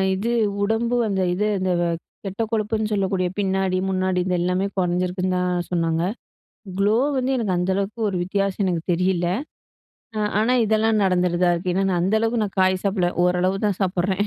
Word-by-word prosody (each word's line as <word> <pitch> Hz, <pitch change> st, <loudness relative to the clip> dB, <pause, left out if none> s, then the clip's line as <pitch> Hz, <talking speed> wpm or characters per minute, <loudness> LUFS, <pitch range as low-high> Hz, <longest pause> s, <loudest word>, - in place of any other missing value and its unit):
இது 220 Hz, +5 st, -2 dB, 0.3 s
உடம்பு 225 Hz, +3 st, 0 dB
அந்த 195 Hz, -2 st, 0 dB
இது 210 Hz, +4 st, 0 dB
அந்த 185 Hz, 0 st, 0 dB, 0.5 s
கெட்ட 195 Hz, +3 st, -4 dB
கொழுப்புன்னு 215 Hz, -1 st, -1 dB
சொல்லக்கூடிய 190 Hz, -2 st, 0 dB
பின்னாடி 190 Hz, -1 st, 0 dB
முன்னாடி 185 Hz, -1 st, 0 dB
இந்த 180 Hz, -1 st, 0 dB
எல்லாமே 180 Hz, +2 st, 0 dB
குறைஞ்சிருக்குன்னு 180 Hz, +1 st, 0 dB
தான் 180 Hz, -1 st, -1 dB
சொன்னாங்க. 165 Hz, -1 st, 0 dB, 0.8 s
க்ளோ 205 Hz, +2 st, +3 dB, 0.2 s
வந்து 260 Hz, +1 st, 0 dB
எனக்கு 205 Hz, -6 st, 0 dB
அந்த 180 Hz, +2 st, 0 dB
அளவுக்கு 200 Hz, +3 st, -3 dB
ஒரு 185 Hz, -, -2 dB
வித்தியாசம் 195 Hz, +1 st, -1 dB
எனக்கு 175 Hz, -3 st, 0 dB
தெரியல. 180 Hz, 0 st, +1 dB, 0.9 s
அ -, -, -1 dB, 0.2 s
ஆனா, 225 Hz, +4 st, +2 dB
இதெல்லாம் 220 Hz, 0 st, +2 dB
நடந்துடுதா 180 Hz, -1 st, +2 dB
இருக்கு. 175 Hz, +1 st, -2 dB
ஏனா 195 Hz, +1 st, +1 dB
நான் 175 Hz, -2 st, +1 dB
அந்த 190 Hz, +4 st, +1 dB
அளவுக்கு 225 Hz, 0 st, +1 dB
நான் 195 Hz, -1 st, -7 dB
காய் 185 Hz, 0 st, +2 dB
சாப்பிடல 190 Hz, -3 st, +1 dB
ஓரளவு 180 Hz, +2 st, +1 dB
தான் 200 Hz, -3 st, -1 dB
சாப்பிடுறேன். 190 Hz, +2 st, 0 dB
190 Hz, 165 wpm, -22 LUFS, 180-205 Hz, 0.9 s, க்ளோ